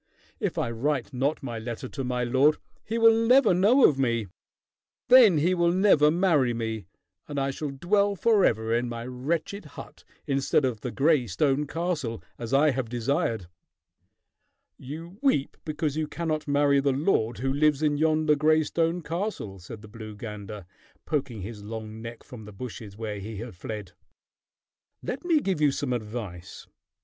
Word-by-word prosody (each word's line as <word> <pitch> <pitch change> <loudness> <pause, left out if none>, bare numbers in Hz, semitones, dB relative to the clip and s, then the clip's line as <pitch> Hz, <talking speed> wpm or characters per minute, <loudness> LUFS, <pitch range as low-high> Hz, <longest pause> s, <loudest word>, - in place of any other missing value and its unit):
If - - -2
I 115 - -1
write 135 +3 -2
not 140 +4 -1
my 120 -4 -4
letter 120 +3 -5
to 135 - -5
my 125 -1 -1
lord, 135 +5 +3 0.3
he 225 - -3
will 225 0 +7
never 230 0 +4
know 210 +9 +5
of 140 -3 -1
me. 115 -4 +1 0.8
Then 240 -9 +8
he 170 +5 +2
will 170 -1 +2
never 180 -5 +5
marry 155 -8 +2
me, 110 -4 -4 0.4
and 145 -1 -3
I 135 0 0
shall 150 +2 -4
dwell 200 +8 +1
forever 140 - +2
in 120 +1 0
my 115 0 -5
wretched 155 +10 -3
hut - - -11 0.2
instead 135 +1 +1
of 120 -5 -2
the 125 - -3
gray 140 -1 +2
stone 135 +9 +1
castle, 155 -9 -3 0.2
as 115 -1 -6
I 145 +2 +4
have 130 -3 -3
desired." 120 - -1 1.3
"You 165 +8 -9
weep 265 - +1
because 150 -1 -2
you 155 -1 -1
cannot 155 -1 -3
marry 145 0 +3
the 140 -1 +1
lord 130 - +1
who 135 +3 -1
lives 150 0 +2
in 150 -1 +2
yonder 155 0 +3
gray 155 +2 +3
stone 165 +2 -1
castle," 165 - -4
said 105 +5 -10
the - - -10
blue 110 -1 -9
gander, 105 -2 -8 0.4
poking 130 -8 -2
his 105 0 -8
long 110 0 -7
neck 115 0 -8
from 115 -4 -11
the 105 - -10
bushes 105 -2 -8
where 110 -2 -4
he 105 +2 -7
had 115 -1 -7
fled. 105 +1 -7 1.1
"Let - - -4
me 330 -4 +3
give 190 - -1
you 145 -2 +4
some 135 -2 -2
advice. 105 -6 -6
135 Hz, 170 wpm, -26 LUFS, 115-160 Hz, 1.3 s, Then